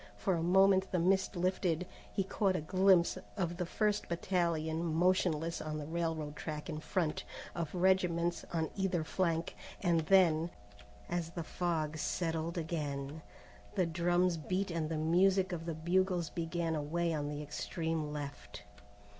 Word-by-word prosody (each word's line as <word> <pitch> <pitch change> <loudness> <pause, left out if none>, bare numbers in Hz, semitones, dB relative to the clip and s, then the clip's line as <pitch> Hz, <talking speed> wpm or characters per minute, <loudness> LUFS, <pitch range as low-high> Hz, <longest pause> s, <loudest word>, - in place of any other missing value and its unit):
For 190 - 0
a 170 - 0
moment 190 +2 +4
the 185 - +1
mist 190 +3 +2
lifted. 180 -1 0 0.3
He 195 - 0
caught 195 0 +1
a 175 - -1
glimpse 185 +2 +4 0.2
of 175 -3 -1
the 180 -2 -2
first 210 +2 0
battalion 170 -2 0
motionless 165 -1 +1
on 155 0 -3
the 150 - -5
railroad 160 -2 -2
track 150 -1 -5
in 155 - -4
front, 165 0 -1 0.3
of 170 -1 -4
regiments 175 -2 +2
on 160 -2 -1
either 190 -4 0
flank, 165 0 -1 0.2
and 175 -3 +2
then, 170 -4 +5 0.6
as 175 -1 -2
the 170 0 -5
fog 155 -3 -2
settled 165 +1 -1
again, 150 -3 -3 0.5
the 185 -3 +3
drums 175 +1 +2
beat 185 +4 -2
and 165 -2 -1
the 160 - -1
music 185 +4 +3
of 165 -1 -4
the 165 - -2
bugles 175 +1 +1
began 165 0 -2
away 165 +3 0
on 145 -2 -2
the 150 0 -4
extreme 160 +1 -3
left. 145 -7 -7
170 Hz, 150 wpm, -34 LUFS, 160-185 Hz, 0.6 s, then